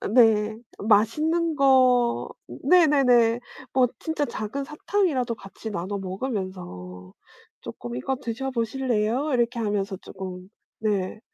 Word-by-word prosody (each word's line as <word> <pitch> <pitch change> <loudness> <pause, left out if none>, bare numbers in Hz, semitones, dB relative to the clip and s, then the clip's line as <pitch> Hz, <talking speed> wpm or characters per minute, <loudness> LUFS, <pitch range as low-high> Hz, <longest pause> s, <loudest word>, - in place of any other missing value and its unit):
어 - - -3
네. 220 -1 +4 0.2
맛있는 305 +11 +2
거 255 -3 +4 0.2
네네네. 255 -9 +4 0.3
뭐 255 -1 +4
진짜 320 -2 -1
작은 275 +6 -4
사탕이라도 300 - 0
같이 195 +3 -9
나눠 200 +2 -3
먹으면서 185 - -6 0.5
쪼끔 120 0 -7
"이거 265 - -2
드셔 255 +1 -4
보실래요?" 245 +2 0
이렇게 240 0 +1
하면서 205 -3 -1
쪼끔 185 -1 -8 0.3
네. 210 -1 -1
230 Hz, 245 characters per minute, -25 LUFS, 200-265 Hz, 0.5 s, 네